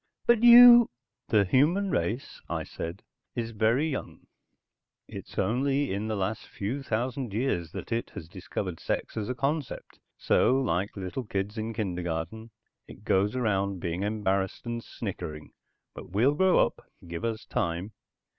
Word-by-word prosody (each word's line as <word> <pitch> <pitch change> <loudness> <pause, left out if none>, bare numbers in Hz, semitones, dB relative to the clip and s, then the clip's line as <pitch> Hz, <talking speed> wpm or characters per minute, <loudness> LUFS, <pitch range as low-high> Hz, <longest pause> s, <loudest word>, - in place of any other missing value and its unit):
"But 235 -2 +4
you...." 240 0 +10 0.4
"The 105 -3 +3
human 170 - +2
race," 105 +10 -2
I - - -2
said, 85 +1 -7 0.3
"is 115 -1 -3
very 115 +7 +2
young. 140 -4 -6 0.8
It's - - -10
only 135 +2 +1
in 100 +2 -2
the 110 - -1
last 100 +2 -3
few 115 +8 -4
thousand 125 -2 -3
years 90 - -1
that - - -7
it 115 +1 -1
has 80 - -7
discovered 90 -1 -5
sex - - -3
as 110 +1 -3
a 125 - -2
concept. 140 +2 -3 0.2
So 130 - +3
like 100 -5 -1
little 95 +7 -4
kids 100 0 -3
in 110 0 -3
kindergarten 90 +1 -3 0.4
it 100 - -13
goes 100 +2 +1
around 100 -5 0
being 85 0 -3
embarrassed 100 -2 -1
and 120 0 -4
snickering. 85 -8 -6 0.4
But - - -10
we'll 115 +10 +3
grow 185 +4 +4
up. - - -8 0.2
Give 85 0 -6
us 115 -1 -3
time." 95 -3 -2
110 Hz, 150 wpm, -28 LUFS, 95-130 Hz, 0.8 s, you